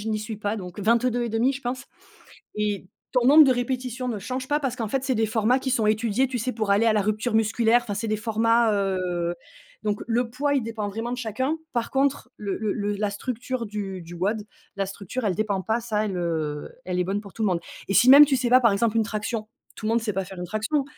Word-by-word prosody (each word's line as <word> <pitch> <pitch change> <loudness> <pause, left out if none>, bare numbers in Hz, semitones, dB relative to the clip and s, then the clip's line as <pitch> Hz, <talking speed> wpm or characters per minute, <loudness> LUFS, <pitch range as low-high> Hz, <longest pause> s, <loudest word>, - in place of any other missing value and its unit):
je 220 - -5
n'y 215 -1 0
suis 215 0 -5
pas 210 +1 -2
donc 180 -1 -8
22,5, 235 +2 +2
je 275 - -6
pense. 245 0 -4 0.7
Et 205 -3 -2 0.2
ton 250 -2 +2
nombre 300 +3 +9
de 265 - +5
répétitions 250 0 -3
ne 220 -4 -2
change 255 +6 -4
pas, 295 +1 +1
parce 260 -3 -2
qu'en 225 -4 -3
fait 270 +4 -1
c'est 265 - +1
des 220 - +2
formats 220 +4 +2
qui 260 0 -3
sont 225 -4 +2
étudiés, 225 +4 +1
tu 255 - -3
sais, 255 +3 -2
pour 215 -3 -2
aller 210 +3 +4
à 220 - +5
la 210 - +2
rupture 215 +3 -1
musculaire. 225 +2 +3
Enfin 205 - -4
c'est 220 +2 -3
des 215 - +1
formats, 225 +1 +2
heu 180 -3 -1 0.5
donc 205 -1 -1
le 235 +1 0
poids 285 +4 0
il 270 - +2
dépend 220 -2 -4
vraiment 225 +4 -4
de - - -2
chacun, 260 +7 -1 0.2
par 235 -1 -1
contre 270 -1 0
le 200 -2 -3
le 215 -2 -1
le 205 -1 -1
la 210 0 0
structure 250 +3 -4
du 195 -3 -5
du 170 +1 -11
WOD, 205 +5 -1 0.3
la 195 - 0
structure 200 +5 -5
elle 190 -3 +1
dépend 205 -3 -1
pas, 225 +4 0
ça, 215 -2 -1
elle, 195 -3 -3
heu, 155 -4 -2 0.2
elle 180 -1 -2
est 180 - +1
bonne 195 +3 -1
pour 200 - -12
tout - - -12
le - - +3
monde. 175 -2 0 0.3
Et 195 - 0
si 255 +2 +7
même 290 +2 +10
tu 270 -2 +2
sais 245 -1 -1
pas, 255 +1 +7
par 230 -4 +4
exemple 225 +2 +1
une 220 - +3
traction, 215 0 -3 0.3
tout 215 - -5
le - - +1
monde 230 +1 +2
sait 215 -2 -1
pas 190 0 -2
faire 190 0 -10
une 180 - -4
traction, 225 - -1
220 Hz, 255 wpm, -25 LUFS, 205-245 Hz, 0.7 s, même